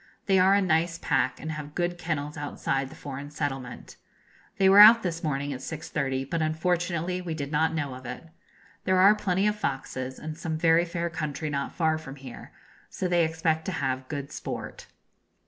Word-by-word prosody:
They 190 -2 +4
are 190 +2 +5
a 200 - +3
nice 165 -1 +1
pack, 130 - 0
and 155 - -5
have 150 -1 -7
good 175 0 -1
kennels 150 -3 -3
outside 140 -2 -2
the - - -12
foreign 140 +1 -7
settlement. 135 -4 -5 0.6
They 190 - +4
were 195 +1 +7
out 225 +2 +10
this 170 -2 -3
morning 145 -2 -1
at 130 - -6
6.30, 135 -2 -3
but 165 +3 -1
unfortunately 175 +2 -1
we 170 -3 -4
did 140 -2 -5
not 160 +2 +1
know 145 -4 -2
of 130 -1 -9
it. 125 +7 -8 0.6
There 185 0 +3
are 195 +3 +7
plenty 195 -2 0
of 210 0 +2
foxes, 130 -7 -4
and 155 0 -6
some 160 0 -3
very 165 +1 +4
fair 170 0 -3
country 155 -1 -3
not 140 -1 -3
far 160 -2 +1
from 135 -3 -9
here; 130 -3 -11 0.4
so 185 - -3
they 175 -1 +3
expect 160 0 0
to 190 - -2
have 130 -3 -2
good 140 -1 -5
sport. - - -6
160 Hz, 190 wpm, -27 LUFS, 140-175 Hz, 0.6 s, out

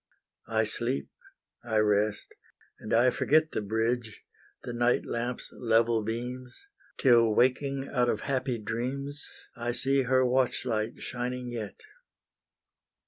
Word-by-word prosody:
I - - +1
sleep, 70 0 -2 0.5
I 110 -2 -1
rest, 105 0 +1 0.5
and 110 - -8
I 120 +2 +5
forget 155 +4 +2
The - - -2
bridge 110 +2 -2 0.4
the 120 - -5
night 120 +1 +2
lamp's 120 +1 -4
level 115 -1 +2
beams, 125 +3 -5 0.4
Till 115 -5 +4
waking 135 +2 +1
out 125 -2 +1
of - - -1
happy 130 -3 -1
dreams, 130 +6 -4 0.3
I 120 0 -2
see 135 +2 +3
her 130 0 +3
watch 125 0 +1
light 110 -1 -1
shining 125 0 -4
yet. 110 -5 -5
120 Hz, 125 wpm, -29 LUFS, 115-130 Hz, 0.5 s, I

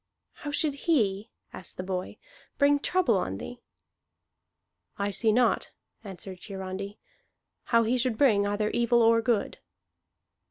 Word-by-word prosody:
"How 295 - -4
should 290 0 +1 0.2
he," 210 -9 +2 0.2
asked 185 - -9
the 185 - -4
boy, 185 -1 -4 0.4
"bring 285 0 +4
trouble 290 - +2
on 95 - -3
thee?" 245 - -8 1.4
"I 200 0 -1
see 220 +3 +1
not," 245 +2 +2 0.3
answered 190 -2 -8
Hiarandi, 195 +1 -6 0.7
"how 230 -1 +3
he 245 +3 +1
should 245 -3 0
bring 210 -7 +4
either 210 +1 0
evil 235 0 +3
or 230 0 +5
good." 225 -3 0
220 Hz, 130 wpm, -28 LUFS, 195-245 Hz, 1.4 s, or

